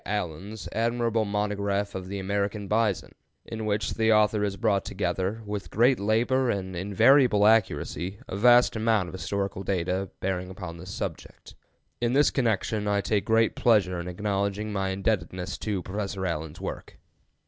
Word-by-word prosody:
Allen's 100 +1 -4
admirable 115 0 0
monograph 100 -1 -1
of 95 -1 -6
"The 100 +1 -5
American 100 +1 -2
Bison," 105 -2 0 0.3
in 110 -1 -5
which 105 +2 0
the 110 0 +2
author 105 -1 +3
has 100 -1 -1
brought 105 -3 +1
together, 95 +3 -2
with 105 -1 -5
great 120 +4 +3
labor 120 +5 +2
and 95 -3 -2
invariable 105 +4 +4
accuracy, 95 -3 +1
a - - -5
vast 120 +4 +5
amount 110 -4 +1
of - - -11
historical 100 0 -3
data 95 0 -1
bearing 95 -1 -2
upon 90 -3 -7
this 90 +3 -10
subject. - - -7 0.5
In 120 0 +1
this 145 +2 +4
connection 110 -4 0
I 100 0 +2
take 105 -1 0
great 115 0 +3
pleasure 95 -7 +3
in 85 - -5
acknowledging 100 +2 -2
my 95 -1 -1
indebtedness 95 -2 -2
to 100 -4 -2
Professor 100 -1 -4
Allen's 80 -3 -4
work. - - -7
100 Hz, 155 wpm, -27 LUFS, 95-110 Hz, 0.5 s, vast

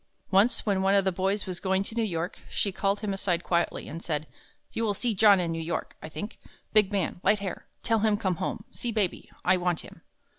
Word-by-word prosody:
Once 200 +6 +4
when 200 -3 +2
one 195 +1 +4
of 195 -1 +4
the 190 - +3
boys 190 +3 0
was 180 -2 -4
going 190 0 +1
to 210 - -6
New 230 - 0
York, 175 -3 -2
she 200 - +1
called 195 +2 0
him 205 -2 -1
aside 180 -3 0
quietly, 170 -1 0
and 165 +2 -7
said, 150 -2 -1 0.5
"You 230 - -1
will 210 -2 +1
see 235 +2 0
John 205 -1 +6
in 170 -2 0
New 165 0 -2
York, 165 +1 -3
I 155 - -7
think.... 210 +7 -6 0.3
Big 215 -2 +5
man, 190 -3 -1
light 205 +2 +4
hair... 200 -3 -5 0.2
tell 225 -1 +2
him 215 -1 +3
come 190 -5 0
home, 185 - -3
see 240 - -3
Baby.... 210 -5 -1 0.2
I 185 +1 +5
want 180 -2 0
him." - - -13
195 Hz, 230 wpm, -28 LUFS, 180-210 Hz, 0.5 s, John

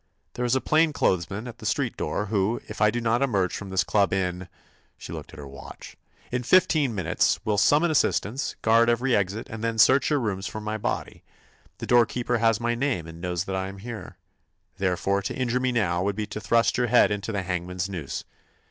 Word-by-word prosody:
There 125 - -2
is 120 +1 +2
a 130 - +1
plain 155 0 +3
clothes 85 - +1
man 105 +5 -5
at 120 - -9
the - - -10
street - - -1
door, 75 +7 -2
who, 105 +2 0
if 105 0 -8
I 105 - +6
do 120 - -2
not 115 +1 +1
emerge 100 -9 +1
from 100 - -6
this 95 -1 +1
club 100 -2 +2
in—" 90 -1 -2 0.5
she - - -9
looked - - -8
at - - -13
her 75 - -8
watch—"in 95 - -9
fifteen 150 -3 +3
minutes, 90 -4 +1
will 105 -2 +1
summon 155 - +4
assistance, 135 -3 0
guard 115 +1 +5
every 120 +2 +2
exit, 100 +2 -1
and 110 0 -7
then 115 -1 -1
search 130 +5 +5
your 150 - +2
rooms 100 -5 -2
for 110 - -6
my 105 0 -4
body. - - -3 0.6
The - - -6
doorkeeper 120 0 +2
has 115 -2 +3
my 120 0 0
name 120 - -1
and 80 0 -10
knows 90 -1 -2
that 95 0 -4
I 95 0 -2
am 100 +1 -8
here. 115 +2 -8 0.6
Therefore, 100 +1 0
to 100 - -4
injure 125 -1 0
me 130 0 0
now 95 -7 0
would 100 +1 -1
be 105 0 -2
to 105 +1 -7
thrust 115 +3 +2
your 125 - +2
head 120 -1 +5
into 105 +2 -3
the 100 -3 -2
hangman's 90 0 -3
noose. 85 -8 -5
105 Hz, 215 wpm, -25 LUFS, 95-120 Hz, 0.6 s, I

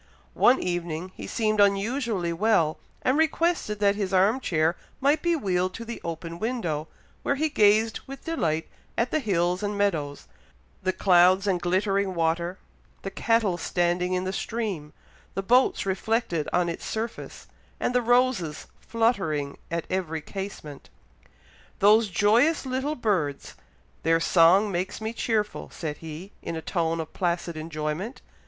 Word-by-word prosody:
One 255 - +5
evening, 175 0 -3
he - - -8
seemed 215 -2 0
unusually 200 -2 +1
well, 170 -4 +2 0.2
and 265 +4 +2
requested 320 -9 +1
that 200 -1 +4
his 200 -2 -3
arm 195 +6 +3
chair 165 -7 +1 0.2
might 285 +3 +2
be 345 -1 +2
wheeled 185 - 0
to 230 - -7
the 235 0 -7
open 170 0 -5
window, 175 -10 -2 0.3
where 280 - 0
he 310 +3 0
gazed 215 -3 +3
with 275 +1 -9
delight 165 - -1 0.3
at 235 +1 +1
the 310 - +2
hills 180 - 0
and 205 0 -2
meadows, 155 -8 -1 0.5
the 185 - +1
clouds 185 +1 +4
and 185 -3 +1
glittering 190 +2 +1
water, 170 +2 0 0.5
the 195 - -4
cattle 220 -7 +1
standing 175 +2 0
in 180 0 0
the 190 0 -3
stream, 195 -9 -3 0.4
the 195 - -2
boats 250 +3 +3
reflected 195 -4 -1
on 175 -1 +2
its 170 - -4
surface, 225 +1 -5 0.3
and - - 0
the 250 - +3
roses 245 -10 +1
fluttering 190 - 0
at 170 -1 -2
every 170 -4 -2
casement. 190 -6 -7 0.9
"Those 215 +2 +5
joyous 235 - +3
little 265 +4 -2
birds! 175 - -1 0.5
their 165 +1 +3
song 180 +5 +5
makes 185 +1 -2
me 220 +1 -4
cheerful," 220 -3 -1
said 150 -3 -5
he, 165 +5 -8
in 165 - -4
a 160 - -4
tone 165 -2 -1
of 160 - -5
placid 170 -2 -1
enjoyment. 155 - -4
190 Hz, 150 wpm, -26 LUFS, 170-225 Hz, 0.9 s, One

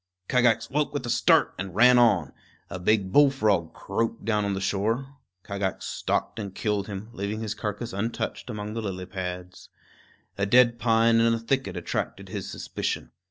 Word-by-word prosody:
Kagax 115 -3 +3
woke 145 +2 -1
with 140 - -2
a 120 - -2
start 120 - +4
and 95 -2 -5
ran 125 +3 +7
on. 100 - +3 0.4
A 95 - -4
big 95 0 +1
bullfrog 110 - +3
croaked 115 +3 -3
down 105 -2 +1
on 100 -1 -1
the - - -2
shore. 115 +8 -1 0.3
Kagax 100 -2 -3
stalked - - -2
and 100 -3 -6
killed 105 -2 -1
him, 100 +1 -6
leaving 105 +1 -3
his 110 -2 -2
carcass 110 +3 -5
untouched 115 +5 -3
among 105 -2 -5
the 115 - -3
lily 95 -3 -4
pads. 90 -1 -7 0.7
A 100 - +1
dead 120 +1 +5
pine 115 -1 +4
in 115 0 +4
a - - -2
thicket 115 -5 -2
attracted 85 - -4
his - - -5
suspicion. - - -4
110 Hz, 170 wpm, -26 LUFS, 100-120 Hz, 0.7 s, ran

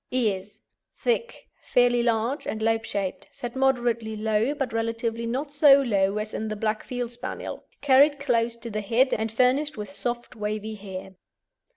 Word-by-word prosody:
EARS 210 -4 -1 0.3
Thick, 480 0 -1
fairly 245 -1 +3
large, 235 +4 0
and 220 - -2
lobe 225 0 +1
shaped; 195 -2 -3
set 240 0 -6
moderately 240 -4 +1
low, 220 +5 +1
but 270 -5 -3
relatively 230 0 -2
not 275 +5 -2
so 285 -1 +7
low 200 -4 +1
as 215 0 -3
in 220 - -3
the 215 - -3
Black 215 0 -1
Field 245 -2 -4
Spaniel; 240 - -6 0.2
carried 285 +1 +5
close 235 -4 +1
to 235 0 -8
the 215 0 -2
head, 235 +6 +2
and 220 0 -1
furnished 255 +5 +2
with 205 -2 -6
soft 240 +5 -3
wavy 215 0 -3
hair. 190 -2 -8
230 Hz, 165 wpm, -26 LUFS, 215-255 Hz, 0.3 s, so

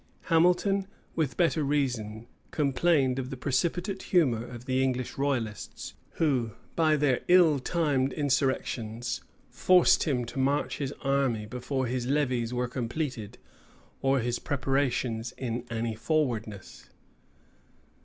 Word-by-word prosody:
Hamilton, 180 +4 +3 0.3
with 155 -5 -1
better 165 -3 +2
reason, 125 -7 -1 0.2
complained 140 -2 +2
of 130 -1 -4
the 135 - -6
precipitate 175 +9 -1
humor 130 - +2
of 120 0 -9
the 130 0 +1
English 130 -2 -1
royalists, 125 -7 -3 0.2
who, 130 -8 0 0.2
by 160 -2 +3
their 145 -4 +2
ill 170 -5 +6
timed 140 -3 0
insurrections, 125 -4 -1 0.3
forced 185 -1 +4
him 130 -6 0
to 120 - -6
march 140 +2 0
his 140 -2 -2
army 135 -6 +1
before 125 +4 -3
his 125 0 -2
levies 130 -5 0
were 125 0 -1
completed, 120 -2 -4 0.6
or 135 -1 +2
his 120 +1 -1
preparations 130 -4 -1
in 120 -1 -3
any 115 0 -2
forwardness. 110 - -2
130 Hz, 120 wpm, -28 LUFS, 120-150 Hz, 0.6 s, ill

